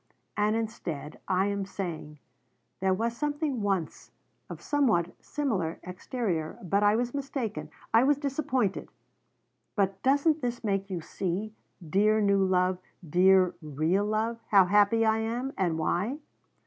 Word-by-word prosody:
And 210 +1 +2
instead 170 -10 -4
I 190 0 +2
am 200 -1 -1
saying: 170 -6 -6 0.6
'There 190 0 +1
was 230 +4 -1
something 290 -3 -2
once 195 -6 -2 0.4
of - - -7
somewhat 225 - +1
similar 200 - -2
exterior. 180 -3 -3
But 195 +3 +1
I 205 +1 +4
was 240 +1 -1
mistaken. 270 -6 -4 0.2
I 225 +2 +6
was 285 +1 +3
disappointed.' 265 -7 -1 0.9
But 195 -1 0
doesn't 285 +4 +3
this 245 -1 -3
make 195 -2 -1
you 180 -3 -3
see 195 +5 -3 0.3
dear 210 +6 +3
new 200 -2 +3
love 185 -1 +2 0.3
dear 185 +3 +4
real 155 +6 0
love 220 +2 -1
how 195 -3 +6
happy 210 +4 +4
I 220 0 +3
am, 240 +5 -2
and 175 -4 0
why? 180 - -1
205 Hz, 135 wpm, -28 LUFS, 185-235 Hz, 0.9 s, I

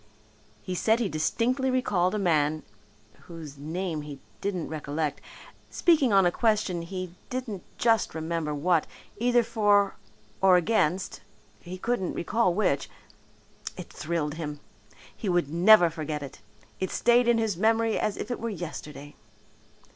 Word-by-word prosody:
He 185 - -4
said 220 +5 +2
he 235 - +1
distinctly 245 - 0
recalled 205 -7 +1
a - - 0
man, 155 -5 +1 0.6
whose 155 -4 -9
name 160 +2 -3
he 145 -2 -9 0.2
didn't 185 -5 -2
recollect, 150 0 -3 0.5
speaking 310 -8 +3
on 195 -2 +5
a 175 - +4
question 210 -5 +1
he 185 0 -6 0.2
didn't 245 -7 -4 0.2
just 225 -6 +2
remember 160 -1 -2
what, 165 +2 +1 0.3
either 240 +2 +3
for 205 -3 +2 0.4
or 190 -1 +6
against 185 -1 0 0.4
he 175 - -10
just 185 - -14
couldn't 235 -7 -1
recall 185 0 +1
which; 180 -9 +1 0.9
it 180 - -9
thrilled 155 -2 -2
him. 150 -2 -5 0.6
He 210 - -4
would 175 -5 +1
never 175 0 +6
forget 155 -2 -4
it. 135 -5 -10 0.4
It 190 - -1
stayed 240 0 +3
in 240 -1 +4
his 220 -4 0
memory 225 +3 +2
as 210 - -1
if 215 - -5
it 245 - -3
were 230 - -3
yesterday. 155 -6 -7
185 Hz, 145 wpm, -27 LUFS, 160-220 Hz, 0.9 s, or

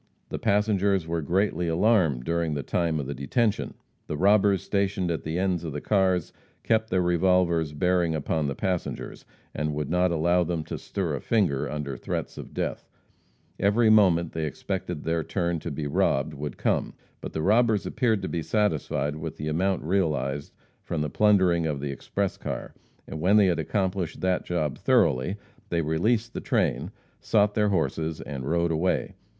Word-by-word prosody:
The - - -4
passengers 100 -3 +2
were 85 0 -2
greatly 90 +2 0
alarmed 80 - +2
during 85 0 -1
the 70 - -3
time 80 +2 0
of 70 - -3
the 70 - -4
detention. 100 - -1 0.3
The 75 - -3
robbers 100 0 +4
stationed 100 -3 0
at 80 - -2
the 80 +2 -3
ends 90 -2 0
of 80 -4 -5
the 75 - -3
cars 95 -2 +1 0.3
kept 110 -1 +1
their 95 -1 +2
revolvers 85 -2 +2
bearing 85 +1 +1
upon 75 0 -1
the 70 - -3
passengers, 90 -2 -3 0.3
and 75 0 -2
would 75 0 -3
not 90 +1 +3
allow 85 +2 +2
them 85 -2 -2
to - - -6
stir 90 -6 -3
a 70 - -3
finger 95 - +1
under 75 -3 -4
threats - - -4
of - - -9
death. - - -4 0.7
Every 110 +3 +4
moment 90 -6 +4
they 80 -1 -2
expected 75 0 -4
their 80 0 0
turn 85 0 -1
to 85 - -5
be 75 0 -4
robbed 70 +1 +1
would 70 -2 -6
come. - - 0 0.3
But - - -7
the 80 - -2
robbers 110 +1 +3
appeared 110 -5 0
to - - -1
be 85 - -2
satisfied 80 -5 0
with 80 0 -6
the 75 - -3
amount 95 +4 0
realized 75 -6 -1 0.3
from 80 - -3
the 75 -1 -2
plundering 95 -6 +3
of 75 -3 -2
the 70 0 -3
express 95 +8 -3
car, - - -5 0.3
and 80 - -7
when 95 +5 +4
they 105 - +6
had 90 -3 +1
accomplished 95 -4 -1
that 95 -1 0
job 80 -6 -2
thoroughly, 65 +11 +2 0.3
they 85 -1 0
released 110 +10 0
the - - -4
train, - - 0 0.3
sought 105 -1 +2
their 105 -1 +2
horses 80 -3 -1
and 70 -1 -5
rode 85 0 +1
away. 90 +4 0
85 Hz, 180 wpm, -26 LUFS, 75-100 Hz, 0.7 s, they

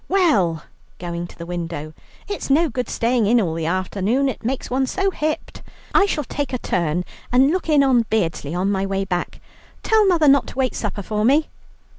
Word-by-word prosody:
Well," 200 - +2 0.3
going 175 0 -5
to - - -16
the 170 - -7
window, 170 -3 -5 0.3
"it's 405 -7 -5
no 315 +4 +3
good 250 0 -3
staying 230 -2 +1
in 240 +3 +4
all 175 -7 0
the 160 -1 -3
afternoon, 195 +9 0
it 250 - -6
makes 255 +3 -2
one 260 +1 +1
so 390 +7 0
hipped. 310 -3 -3 0.3
I 405 - +5
shall 300 -6 -1
take 285 +1 -4
a - - +1
turn 175 -5 -1 0.3
and 260 +4 +4
look 360 -1 -2
in 295 -2 +5
on 245 -4 +3
Beardsley 165 -7 -1
on 190 +3 0
my 195 -1 0
way 195 0 -1
back. 180 -2 -3 0.4
Tell 435 -2 +4
mother 335 -5 +3
not 280 0 +5
to - - -10
wait 260 -2 +1
supper 210 -2 -4
for 210 +2 -2
me." 285 +7 +3
230 Hz, 200 wpm, -21 LUFS, 180-280 Hz, 0.4 s, I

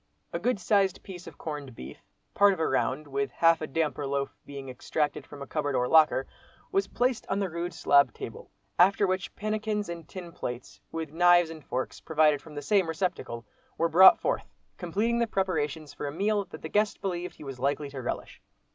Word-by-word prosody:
A 170 - -1
good 230 +3 0
sized 195 -1 +2
piece 180 -2 -9
of - - -11
corned 145 -5 -6
beef, 65 -4 -9 0.3
part 200 0 +5
of 190 - -6
a 160 - +1
round, 135 +2 0
with 140 0 -1
half 165 +5 +3
a 155 - -3
"damper" 150 -1 -1
loaf 140 0 -2
being 140 -1 -7
extracted 145 +4 -2
from 145 -1 -9
a - - -7
cupboard 145 -1 -2
or 125 0 +1
locker, 155 -3 +5 0.5
was 390 0 +1
placed 250 -1 0
on 195 - 0
the 195 -3 -1
rude 170 +2 -3
slab 145 -3 +4
table; - - -9 0.3
after 195 +3 +5
which 185 0 -2
pannikins 215 -1 -2
and 170 -2 -7
tin 180 -3 -8
plates, 125 -6 -7
with 160 -2 -4
knives 175 0 +5
and 160 -2 -10
forks, 130 0 -4
provided 155 -2 +3
from 155 -2 -13
the 145 - -5
same 195 +2 +3
receptacle, 160 - -3 0.3
were 165 +1 +2
brought 185 +4 +9
forth, - - -2 0.3
completing 210 +7 0
the 235 - +2
preparations 160 -7 -2
for 145 - -5
a - - -3
meal 200 +5 0
that - - -11
the - - -3
guest 210 +2 +1
believed 180 -2 -3
he - - -12
was 135 -3 -7
likely 140 +2 -1
to 135 -2 -6
relish. 120 - -5
165 Hz, 200 wpm, -28 LUFS, 145-190 Hz, 0.5 s, brought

